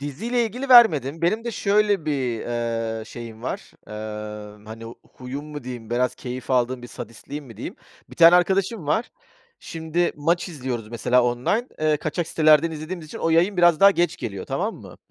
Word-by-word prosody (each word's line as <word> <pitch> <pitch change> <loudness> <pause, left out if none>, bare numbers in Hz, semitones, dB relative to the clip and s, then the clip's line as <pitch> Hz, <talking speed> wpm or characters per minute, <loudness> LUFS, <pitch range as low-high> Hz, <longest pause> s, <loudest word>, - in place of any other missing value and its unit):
Diziyle 220 - -2
ilgili 250 +5 -5
vermedim. 165 - +6
Benim 215 +7 +1
de 235 - -2
şöyle 205 -4 +1
bir, 130 -6 -1
eee, 115 -2 -3
şeyim 115 -1 -10
var, - - -5 0.2
eee, 105 -1 -7
hani 115 +1 -9 0.2
huyum 130 +3 -6
mu 145 -4 -8
diyeyim? 120 -3 -8
Biraz 125 +1 +1
keyif 125 +1 -7
aldığım 125 0 +1
bir - - -7
sadistliğim 125 +6 -8
mi 115 -5 -13
diyeyim? - - -7 0.3
1 - - -13
tane 170 +1 +8
arkadaşım 190 +1 +1
var. 220 +11 0 0.5
Şimdi 165 +2 -2
maç 170 +5 0
izliyoruz 125 -8 -5
mesela 120 +2 +2
online, 125 - 0
eee, 155 -1 +2
kaçak 155 +3 -3
sitelerden 155 +1 +4
izlediğimiz 155 +1 -6
için - - -9
o 165 - 0
yayın 175 +4 +3
biraz 175 -2 +4
daha 200 0 +9
geç 175 -2 0
geliyor, 100 -4 -6
tamam - - -2
mı? - - -13
145 Hz, 175 wpm, -23 LUFS, 120-175 Hz, 0.5 s, daha